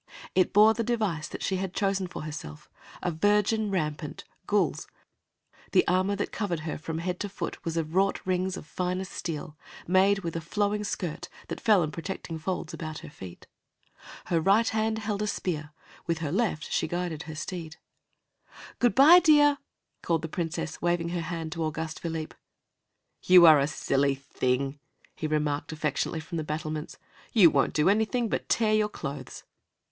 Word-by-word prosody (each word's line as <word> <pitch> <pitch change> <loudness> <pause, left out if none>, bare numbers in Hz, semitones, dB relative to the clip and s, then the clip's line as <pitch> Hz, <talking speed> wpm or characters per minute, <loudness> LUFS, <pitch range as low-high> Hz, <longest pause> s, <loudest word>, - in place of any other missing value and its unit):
It 185 - +3
bore 215 +2 +7
the 230 - -2
device 210 -10 -1
that - - -7
she 190 - 0
had 190 -1 -4
chosen 195 -2 0
for 175 - -7
herself, 145 - -8 0.3
a 180 - 0
virgin 210 +5 +2
rampant, 150 -6 -3 0.2
gules. - - +1 0.9
The - - +4
armor 185 +3 +2
that 205 - -3
covered 180 -7 -2
her 155 -2 -4
from 160 +1 -4
head 180 +2 -3
to 205 - -3
foot 195 - -6
was 165 -1 -3
of 160 -1 -2
wrought 195 +2 +2
rings 185 0 0
of - - -9
finest 180 +3 -3
steel, 155 -2 -5 0.3
made 195 +2 +3
with 165 -1 -4
a 165 - -2
flowing 205 +5 -1
skirt 175 -4 -4 0.2
that - - -5
fell 210 -6 +4
in 155 - -3
protecting 165 -1 -5
folds 175 0 -3
about 155 -1 -5
her - - -10
feet. 90 -10 -11 0.8
Her 165 -2 +1
right 205 +6 +4
hand 220 0 0
held 215 -2 -3
a 210 - 0
spear; 155 -7 -3 0.4
with 165 -1 0
her 155 -3 -3
left 190 -5 -1
she - - +1
guided 175 -2 -3
her 155 - -6
steed. 160 0 -6 1.0
"Good 245 -1 +3
by, 310 +7 +9
dear!" 295 -4 +5 0.4
called 165 -2 0
the - - -2
Princess, 165 -1 -4
waving 175 -1 0
her 175 0 -2
hand 165 -1 -4
to 165 0 -3
Auguste 160 0 -3
Philippe. 160 -2 -4 0.9
"You 180 -1 +8
are 155 -3 +9
a 140 - +2
silly 140 -1 +1
thing," 135 0 -2 0.4
he 155 - -3
remarked, 150 -1 -1
affectionately, 155 +1 -2
from 165 +2 -6
the - - -2
battlements. 155 0 -4 0.4
"You 185 -8 +7
won't - - +2
do 150 +2 +3
anything 220 +3 +2
but - - -3
tear 220 -2 +2
your 215 -1 +2
clothes." 140 - -7
175 Hz, 175 wpm, -28 LUFS, 155-200 Hz, 1.0 s, by